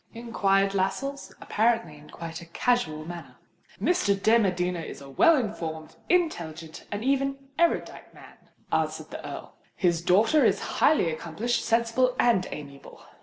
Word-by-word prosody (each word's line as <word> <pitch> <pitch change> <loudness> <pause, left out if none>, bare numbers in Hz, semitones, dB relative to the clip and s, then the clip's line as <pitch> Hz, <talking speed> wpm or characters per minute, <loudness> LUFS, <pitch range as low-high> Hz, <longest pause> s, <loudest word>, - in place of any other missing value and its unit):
inquired 195 -4 +1
Lascelles, 200 +9 -2
apparently 225 -7 +1
in 150 0 -16
quite 165 0 -7
a 170 - -12
casual 165 -6 0
manner. 175 0 -9 0.4
"Mr. 210 - +1
de 225 +4 +4
Medina 180 -3 0
is 165 - -7
a 140 - -11
well 330 - +5
informed, 165 - -4
intelligent, 165 - -1
and 205 +1 -3
even 275 +1 +1 0.2
erudite 340 0 0
man," - - -17 0.2
answered - - -1
the - - -7
Earl. - - -8 0.2
"His 170 -3 +1
daughter 215 - +4
is - - +3 0.2
highly 180 - +4
accomplished, 185 +10 -2
sensible, 235 +2 +2
and 225 -7 +3
amiable. 140 -2 -10
195 Hz, 140 wpm, -27 LUFS, 165-240 Hz, 0.4 s, well